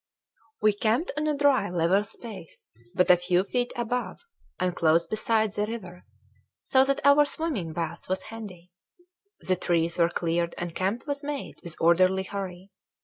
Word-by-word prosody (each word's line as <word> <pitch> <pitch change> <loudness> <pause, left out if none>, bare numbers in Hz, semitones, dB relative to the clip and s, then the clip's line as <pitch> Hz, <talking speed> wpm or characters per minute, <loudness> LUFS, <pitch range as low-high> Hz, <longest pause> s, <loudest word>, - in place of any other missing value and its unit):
We 215 -1 +5
camped 225 - 0
on 300 +1 -1
a 300 -1 0
dry 280 -8 +3
level 175 +3 +2
space, 205 -5 -10 0.2
but 180 - +5
a 180 - +7
few 180 +1 +1
feet 245 +4 -1
above, 240 0 -3 0.3
and 180 -1 0
close 165 0 +3
beside, 215 +3 0
the 210 0 -1
river 185 -6 -8 0.6
so 260 -1 +4
that 275 0 -1
our 280 +1 +7
swimming 285 - -2
bath 170 +1 -5
was 185 - -1
handy. 195 -6 -10 0.7
The 185 -1 0
trees 170 -1 0
were 170 0 +4
cleared 170 0 -1
and 175 -1 -4
camp 195 +7 -2
was 285 -1 -3
made 290 -1 -5
with 170 -1 -8
orderly 185 +3 +4
hurry. 190 -1 -6
190 Hz, 160 wpm, -27 LUFS, 175-235 Hz, 0.7 s, a